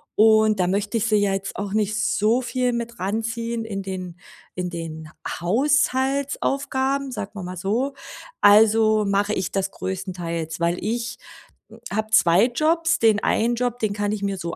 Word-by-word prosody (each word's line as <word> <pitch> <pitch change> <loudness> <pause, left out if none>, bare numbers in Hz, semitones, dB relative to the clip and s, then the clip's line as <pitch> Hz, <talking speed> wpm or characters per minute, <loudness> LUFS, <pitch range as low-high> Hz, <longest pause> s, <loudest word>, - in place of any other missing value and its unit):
und 220 -1 +5
da 180 - +3
möchte 200 +4 -1
ich 225 - 0
sie 215 -1 +3
ja 205 -1 +2
jetzt 195 0 -4
auch 200 -1 -4
nicht 215 0 0
so 220 +4 +2
viel 250 0 -1
mit 235 0 -4
ran 200 +5 -1
ziehen 230 0 -3
in 200 -3 -4
den 185 -2 -6 0.4
in 180 -1 -3
den 160 -2 -7 0.3
Haushaltsaufgaben, 270 - 0
sagen 210 -4 -6
wir 195 - -6
mal 180 +1 -6
so. 225 +10 -1 0.5
Also, 215 +1 +5
mache 200 +1 +1
ich 185 -3 -2
das 195 -1 -1
größtenteils, 175 -4 -4
weil 170 +1 +1
ich 230 +3 -3 0.8
habe 220 +1 -1
2 180 +1 +5
Jobs. 325 +6 +1
Den 220 -2 +3
einen 235 +2 +2
Job, 245 0 -1
den 215 -3 0
kann 205 0 -1
ich 205 - -4
mir 200 -1 -1
so 170 -2 -5
215 Hz, 170 wpm, -23 LUFS, 190-235 Hz, 0.8 s, und